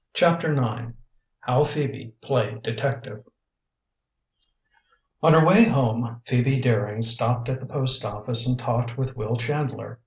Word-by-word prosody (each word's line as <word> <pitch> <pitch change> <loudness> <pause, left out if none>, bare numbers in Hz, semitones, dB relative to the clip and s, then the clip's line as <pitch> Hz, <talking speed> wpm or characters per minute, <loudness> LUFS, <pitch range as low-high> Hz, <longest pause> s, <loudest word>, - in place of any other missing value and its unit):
CHAPTER 170 -2 +2
IX 120 -2 -3 0.5
HOW 125 +4 +1
PHOEBE 140 -4 -5
PLAYED 115 -5 -2
DETECTIVE 130 +3 -5 2.0
On 160 0 +5
her 160 0 +6
way 190 +7 +7
home 120 - -1
Phoebe 130 +1 +1
Daring 110 -3 -1
stopped 120 +1 +3
at 130 0 -3
the 130 - -11
post 130 -2 0
office 115 +4 +1
and 125 0 0
talked 120 0 -3
with 130 -1 -4
Will 110 0 -4
Chandler. 135 -1 -5
125 Hz, 130 wpm, -23 LUFS, 115-135 Hz, 2.0 s, way